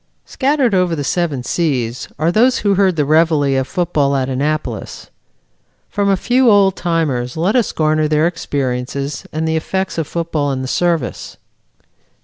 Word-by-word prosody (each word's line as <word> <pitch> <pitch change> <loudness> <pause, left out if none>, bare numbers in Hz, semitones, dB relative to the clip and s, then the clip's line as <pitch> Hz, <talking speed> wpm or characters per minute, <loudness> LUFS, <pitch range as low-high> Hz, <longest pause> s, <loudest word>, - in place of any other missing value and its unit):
Scattered 270 -4 +1
over 180 -3 +2
the 145 - -3
seven 150 -4 -1
seas 125 -6 -1
are 160 +3 +1
those 245 +6 +3
who 205 -1 +1
heard 190 -2 +2
the 150 -2 +1
reveille 150 -3 +3
of 130 - -3
football 150 -5 0
at 135 -1 -1
Annapolis. 150 +4 -3 0.8
From 200 -1 0
a 195 - +3
few 250 +4 +3
old 200 -3 +4
timers 155 -7 -1
let 180 +8 +1
us 245 -4 +2
garner 155 0 +1
their 150 +1 +2
experiences 140 -4 -3
and 160 +1 -2
the 160 - 0
effects 190 +2 -2
of 160 - -2
football 160 -4 -2
in 130 -1 -3
the - - -4
Service. 165 -3 -1
160 Hz, 160 wpm, -17 LUFS, 140-185 Hz, 0.8 s, old